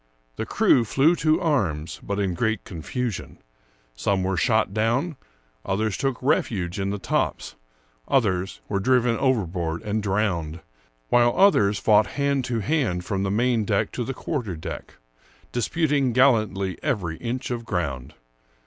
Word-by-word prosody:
The -, -, -4 dB
crew 120 Hz, -, +4 dB
flew 140 Hz, +9 st, +3 dB
to 155 Hz, 0 st, +2 dB
arms, 85 Hz, -, -1 dB
but 100 Hz, 0 st, -3 dB
in 95 Hz, -3 st, 0 dB
great 110 Hz, +3 st, -1 dB
confusion; 105 Hz, -, -5 dB, 0.6 s
some 95 Hz, +9 st, 0 dB
were 95 Hz, 0 st, 0 dB
shot 110 Hz, +2 st, +2 dB
down, 120 Hz, -, 0 dB, 0.5 s
others 100 Hz, +1 st, -1 dB
took 135 Hz, -3 st, -1 dB
refuge 100 Hz, -, 0 dB
in 95 Hz, 0 st, -1 dB
the 100 Hz, -, -2 dB
tops, 95 Hz, -, -2 dB, 0.5 s
others 95 Hz, -7 st, 0 dB
were 100 Hz, -, -1 dB
driven 125 Hz, +2 st, +2 dB
overboard 90 Hz, -10 st, 0 dB
and 105 Hz, +1 st, -1 dB
drowned, 95 Hz, -6 st, -1 dB, 0.5 s
while 120 Hz, 0 st, +4 dB
others 105 Hz, -, +4 dB
fought 105 Hz, +1 st, +4 dB
hand 140 Hz, -2 st, +1 dB
to 120 Hz, -3 st, -1 dB
hand 105 Hz, -, 0 dB
from 95 Hz, -2 st, -2 dB
the 100 Hz, -, 0 dB
main 115 Hz, +2 st, +1 dB
deck 105 Hz, -2 st, 0 dB
to 125 Hz, -, -3 dB
the 135 Hz, +2 st, -4 dB
quarter 120 Hz, -, -3 dB
deck, 85 Hz, +1 st, -7 dB, 0.6 s
disputing 140 Hz, +1 st, +1 dB
gallantly 110 Hz, -8 st, +2 dB
every 95 Hz, -, -2 dB
inch 125 Hz, +2 st, -4 dB
of 120 Hz, -1 st, -3 dB
ground. 75 Hz, -, -3 dB
110 Hz, 145 wpm, -24 LUFS, 95-125 Hz, 0.6 s, crew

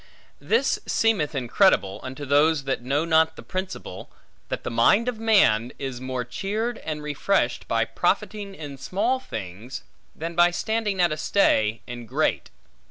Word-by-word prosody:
This 460 Hz, -, +1 dB
seemeth 190 Hz, -10 st, +1 dB
incredible, 125 Hz, -, +2 dB
unto 130 Hz, +3 st, -7 dB
those 145 Hz, +2 st, +3 dB
that 135 Hz, -2 st, -2 dB
know 140 Hz, +6 st, 0 dB
not 160 Hz, -1 st, +3 dB
the -, -, -11 dB
principle, 185 Hz, -, -6 dB, 0.4 s
that -, -, -4 dB
the -, -, -4 dB
mind 120 Hz, -, +4 dB
of 245 Hz, -3 st, -2 dB
man, 125 Hz, -, +3 dB
is 130 Hz, -3 st, -5 dB
more 130 Hz, -1 st, -3 dB
cheered 210 Hz, -, -3 dB
and 150 Hz, -1 st, -5 dB
refreshed 150 Hz, +7 st, 0 dB
by -, -, +1 dB
profiting 205 Hz, -2 st, -1 dB
in 145 Hz, -5 st, -8 dB
small 220 Hz, -, 0 dB
things, 110 Hz, -, -7 dB, 0.3 s
than 165 Hz, +2 st, -5 dB
by 175 Hz, +1 st, +5 dB
standing 210 Hz, +2 st, -1 dB
at 175 Hz, -2 st, +4 dB
a 155 Hz, -, -2 dB
stay, 110 Hz, -, +2 dB
in 120 Hz, -1 st, -8 dB
great. -, -, 0 dB
155 Hz, 155 wpm, -24 LUFS, 125-200 Hz, 0.4 s, by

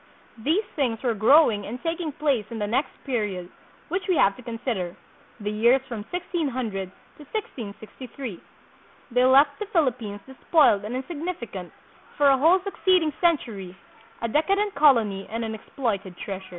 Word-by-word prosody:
These 330 Hz, -, +2 dB
things 250 Hz, -6 st, 0 dB
were 240 Hz, -3 st, +2 dB
growing 220 Hz, -1 st, +5 dB
and 230 Hz, +4 st, -5 dB
taking 330 Hz, -1 st, -2 dB
place 280 Hz, -7 st, 0 dB
in 230 Hz, -, -6 dB
the 210 Hz, -, 0 dB
next 250 Hz, +7 st, 0 dB
period 205 Hz, -9 st, -2 dB, 0.4 s
which 370 Hz, +4 st, -1 dB
we 365 Hz, -, +4 dB
have 195 Hz, -9 st, +4 dB
to -, -, -10 dB
consider, 230 Hz, -7 st, -3 dB, 0.5 s
the 210 Hz, 0 st, -2 dB
years 235 Hz, +5 st, +4 dB
from 220 Hz, -4 st, -5 dB
1600 260 Hz, -, -2 dB, 0.3 s
to 300 Hz, -, -12 dB
1663. 240 Hz, -, -6 dB, 0.7 s
They 250 Hz, +1 st, +4 dB
left 280 Hz, +2 st, +5 dB
the 420 Hz, -, -4 dB
Philippines 245 Hz, -, 0 dB
despoiled 265 Hz, -, +3 dB
and 230 Hz, +4 st, -4 dB
insignifi 295 Hz, -, -5 dB
cant 180 Hz, -2 st, -7 dB, 0.5 s
for 285 Hz, -1 st, +5 dB
a 270 Hz, -, +4 dB
whole 335 Hz, +7 st, +5 dB
succeeding 370 Hz, -5 st, +2 dB
century, 225 Hz, -, 0 dB, 0.5 s
a -, -, +1 dB
decadent 395 Hz, -, +1 dB
colony 230 Hz, -10 st, +4 dB
and 230 Hz, +1 st, -3 dB
an 220 Hz, -, -4 dB
exploited 205 Hz, -4 st, -3 dB
treasure. 195 Hz, -1 st, -5 dB
250 Hz, 150 wpm, -25 LUFS, 210-305 Hz, 0.7 s, growing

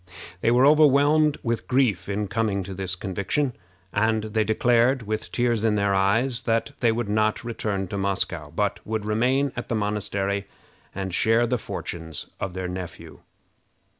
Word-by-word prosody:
They 115 Hz, -, +2 dB
were 125 Hz, +3 st, +5 dB
overwhelmed 150 Hz, 0 st, +5 dB
with 115 Hz, -1 st, -2 dB
grief 115 Hz, -9 st, +1 dB
in 105 Hz, +1 st, -1 dB
coming 100 Hz, -1 st, -1 dB
to 95 Hz, +1 st, -7 dB
this 95 Hz, -1 st, -2 dB
conviction, 100 Hz, +8 st, -1 dB, 0.4 s
and 110 Hz, +1 st, +1 dB
they 110 Hz, 0 st, 0 dB
declared, 120 Hz, +3 st, +2 dB
with 110 Hz, 0 st, -4 dB
tears 120 Hz, -3 st, +1 dB
in 110 Hz, -2 st, +2 dB
their 100 Hz, -1 st, +1 dB
eyes, 115 Hz, +6 st, +2 dB
that 115 Hz, +4 st, +1 dB
they 120 Hz, -2 st, +3 dB
would 115 Hz, 0 st, -2 dB
not 110 Hz, +2 st, +1 dB
return 105 Hz, -5 st, -3 dB
to 100 Hz, -, -3 dB
Moscow, 100 Hz, -1 st, -2 dB
but -, -, -1 dB
would 110 Hz, -1 st, -3 dB
remain 125 Hz, +6 st, +1 dB
at -, -, -5 dB
the 115 Hz, -, 0 dB
monastery 100 Hz, -1 st, -1 dB, 0.5 s
and 95 Hz, -1 st, -4 dB
share 115 Hz, +5 st, +3 dB
the 120 Hz, +1 st, 0 dB
fortunes 80 Hz, -6 st, -6 dB
of 95 Hz, -2 st, -4 dB
their 95 Hz, -1 st, -3 dB
nephew. 90 Hz, -1 st, -7 dB
110 Hz, 165 wpm, -25 LUFS, 100-120 Hz, 0.5 s, were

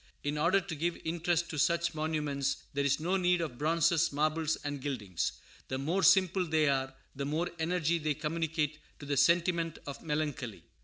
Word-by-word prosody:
In 145 Hz, +1 st, -1 dB
order 170 Hz, +6 st, +3 dB
to 190 Hz, -3 st, -6 dB
give 170 Hz, +3 st, -1 dB
interest 170 Hz, +1 st, 0 dB
to 155 Hz, -, -3 dB
such 170 Hz, +3 st, +2 dB
monuments, 150 Hz, -3 st, -1 dB
there 140 Hz, 0 st, 0 dB
is 140 Hz, 0 st, +2 dB
no 180 Hz, +5 st, +1 dB
need 180 Hz, -1 st, +3 dB
of 150 Hz, -8 st, -4 dB
bronzes, 165 Hz, +1 st, +3 dB
marbles, 155 Hz, +2 st, +1 dB
and 145 Hz, -1 st, -4 dB
gildings. 110 Hz, -, -2 dB, 0.3 s
The 130 Hz, -, -2 dB
more 165 Hz, +8 st, 0 dB
simple 185 Hz, -1 st, +4 dB
they 155 Hz, -1 st, +2 dB
are, 135 Hz, -1 st, 0 dB, 0.2 s
the 140 Hz, 0 st, -3 dB
more 155 Hz, +5 st, -1 dB
energy 170 Hz, 0 st, +1 dB
they 155 Hz, -1 st, -1 dB
communicate 155 Hz, -1 st, -1 dB, 0.2 s
to 145 Hz, -, -10 dB
the 145 Hz, 0 st, -1 dB
sentiment 170 Hz, +2 st, +2 dB
of 140 Hz, -1 st, -7 dB
melancholy. 150 Hz, -, -3 dB
155 Hz, 175 wpm, -31 LUFS, 145-170 Hz, 0.3 s, simple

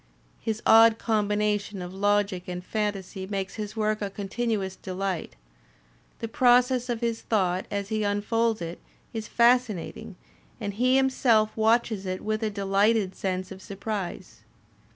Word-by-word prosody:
His 220 Hz, 0 st, -3 dB
odd 225 Hz, 0 st, +7 dB
combination 210 Hz, -2 st, 0 dB
of 180 Hz, 0 st, -6 dB
logic 200 Hz, -2 st, +1 dB
and 180 Hz, 0 st, -5 dB
fantasy 195 Hz, -3 st, -3 dB
makes 195 Hz, -1 st, -3 dB
his 215 Hz, 0 st, -6 dB
work 215 Hz, -1 st, 0 dB
a 200 Hz, -, -2 dB
continuous 200 Hz, -1 st, -2 dB
delight; 185 Hz, -2 st, -4 dB, 0.8 s
the 230 Hz, -, -4 dB
process 250 Hz, +1 st, +3 dB
of 235 Hz, -1 st, -2 dB
his 230 Hz, -1 st, -1 dB
thought 185 Hz, -4 st, 0 dB
as 200 Hz, -1 st, -3 dB
he 215 Hz, -1 st, -1 dB
unfolds 215 Hz, +1 st, 0 dB
it 170 Hz, +1 st, -6 dB, 0.3 s
is 220 Hz, -1 st, -4 dB
fascinating, 235 Hz, -4 st, +1 dB, 0.4 s
and 205 Hz, -3 st, -3 dB
he 250 Hz, +5 st, +2 dB
himself 250 Hz, -5 st, +3 dB
watches 220 Hz, -3 st, +2 dB
it 185 Hz, 0 st, -3 dB
with 215 Hz, +1 st, -2 dB
a 220 Hz, -, 0 dB
deUghted 200 Hz, 0 st, +1 dB
sense 185 Hz, 0 st, -3 dB
of 190 Hz, 0 st, -9 dB
surprise. 200 Hz, -1 st, -5 dB
210 Hz, 140 wpm, -26 LUFS, 195-225 Hz, 0.8 s, odd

